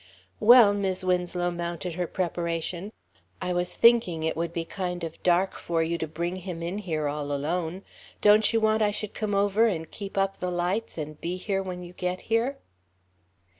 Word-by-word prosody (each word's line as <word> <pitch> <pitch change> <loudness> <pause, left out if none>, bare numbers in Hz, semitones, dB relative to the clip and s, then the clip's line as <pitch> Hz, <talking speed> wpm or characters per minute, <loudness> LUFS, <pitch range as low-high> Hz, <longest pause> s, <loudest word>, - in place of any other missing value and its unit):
"Well," 225 -2 +8
Mis' 190 -2 -1
Winslow 180 -1 0
mounted 170 0 -4
her 175 +1 -2
preparation, 170 +2 -3 0.5
"I 180 - -2
was 175 0 -1
thinking 225 -9 +4
it 160 - 0
would 165 0 -2
be 170 -1 -3
kind 180 -1 -4
of 165 -1 -6
dark 180 +2 +3
for 165 -1 -1
you 170 +1 -2
to 160 - -2
bring 170 +4 -3
him 180 -2 -6
in 180 +4 -3
here 160 -7 -2
all 145 0 -3
alone. 165 +5 -2 0.4
Don't 210 +1 +5
you 225 - +2
want 220 0 +2
I 210 - +4
should 210 0 -4
come 210 -2 -2
over 205 +3 +3
and 160 -7 -3
keep 200 -1 -7
up 195 0 0
the 180 - -2
lights 180 +5 -2
and 155 -1 -6
be 175 +2 -2
here 195 +1 -1
when 180 -1 -6
you 175 0 -10
get 180 0 -3
here?" 235 +5 0
180 Hz, 190 wpm, -27 LUFS, 170-200 Hz, 0.5 s, Well